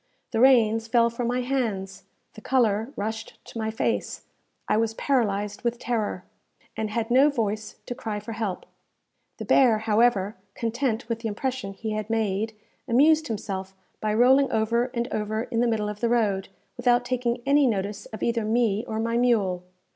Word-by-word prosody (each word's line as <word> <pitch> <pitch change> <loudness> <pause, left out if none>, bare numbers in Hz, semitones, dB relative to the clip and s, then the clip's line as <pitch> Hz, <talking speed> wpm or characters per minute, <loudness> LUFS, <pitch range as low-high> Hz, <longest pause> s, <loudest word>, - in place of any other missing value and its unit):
The 225 - 0
reins 225 -3 +5
fell 235 0 +3
from 235 +1 -3
my 250 +1 0
hands; 225 -8 -2 0.3
the 215 - -12
colour 225 -2 +1
rushed 220 +2 -5
to 230 - -8
my 220 0 -1
face; 220 - -2 0.4
I - - +2
was 225 0 0
paralyzed 210 -7 0
with 235 0 -1
terror, 220 -6 -2 0.5
and 220 -1 -2
had 225 +2 -2
no 270 +4 +6
voice 215 -5 -2
to - - -4
cry 220 -4 -4
for 210 +2 -8
help. 215 -4 -3 0.7
The - - -6
bear, 245 -5 +5
however, 215 -2 +2 0.2
content 235 0 -1
with 230 -1 -2
the 230 - -3
impression 230 -1 -3
he 220 +2 -5
had 215 0 -3
made, 220 -1 -1 0.3
amused 300 +6 +4
himself 195 -4 -4 0.2
by 215 0 -1
rolling 265 +4 +5
over 230 +2 +1
and 240 -2 -3
over 215 +1 -1
in 235 -2 -3
the 240 - +3
middle 220 -2 0
of 210 0 -5
the 235 - +1
road, 205 -5 +1 0.3
without 245 0 +3
taking 245 -1 -1
any 280 0 +4
notice 205 -2 -2
of 220 - -7
either 235 -1 +1
me 220 -1 +1
or 220 - -3
my 230 +1 0
mule. 210 -7 +2
225 Hz, 175 wpm, -25 LUFS, 215-245 Hz, 0.7 s, no